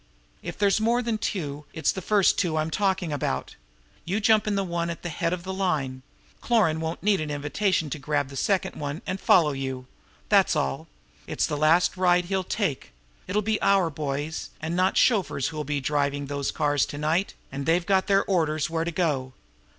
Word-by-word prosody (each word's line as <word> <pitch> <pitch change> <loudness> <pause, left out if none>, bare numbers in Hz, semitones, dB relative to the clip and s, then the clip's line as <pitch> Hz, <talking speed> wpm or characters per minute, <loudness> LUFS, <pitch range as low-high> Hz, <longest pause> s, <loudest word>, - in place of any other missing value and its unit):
If - - -6
there's 205 +1 +2
more 235 +3 +2
than 225 -2 -1
two, 150 -8 -3
it's 160 -3 +1
the 190 - -5
first 205 +1 +3
two 165 -4 0
I'm 155 +1 -1
talking 190 -4 0
about. 65 - -3 0.5
You 195 +5 -1
jump 220 0 +3
into 210 - +1
the 195 - +1
one 170 -2 -2
at 170 - -6
the 175 - -3
head 165 +1 -1
of 180 -1 -3
the 190 +1 -4
line. 150 -9 -1 0.4
Cloran 200 -10 +2
won't 160 +2 -4
need 200 -4 +3
any 150 -1 -3
invitation 160 +4 0
to 155 - -3
grab 145 0 -1
the 140 - -10
second 190 +6 0
one 145 +2 -5
and 185 +1 -3
follow 160 -5 +5
you. 130 -2 -4 0.4
That's - - +4
all! 70 0 -2 0.4
It's - - 0
the - - -2
last 160 +6 +3
ride 180 -1 +3
he'll 190 +1 -1
take. 180 - -2 0.3
It'll 205 +3 0
be 215 +1 0
our 195 -4 +3
boys, 145 +1 -4
and 160 +2 -3
not 185 +1 +2
chauffeurs, 190 - +2
who'll 155 -1 -4
be 145 0 -2
driving 145 0 -1
those 140 0 -2
cars 145 -2 +1
to 145 - -7
night, 160 +6 0 0.2
and 140 +1 -5
they've 170 +1 +2
got 190 -1 +2
their 195 0 +3
orders 160 -4 0
where 165 0 0
to 170 - -2
go. 145 -7 -1
165 Hz, 200 wpm, -26 LUFS, 145-190 Hz, 0.5 s, follow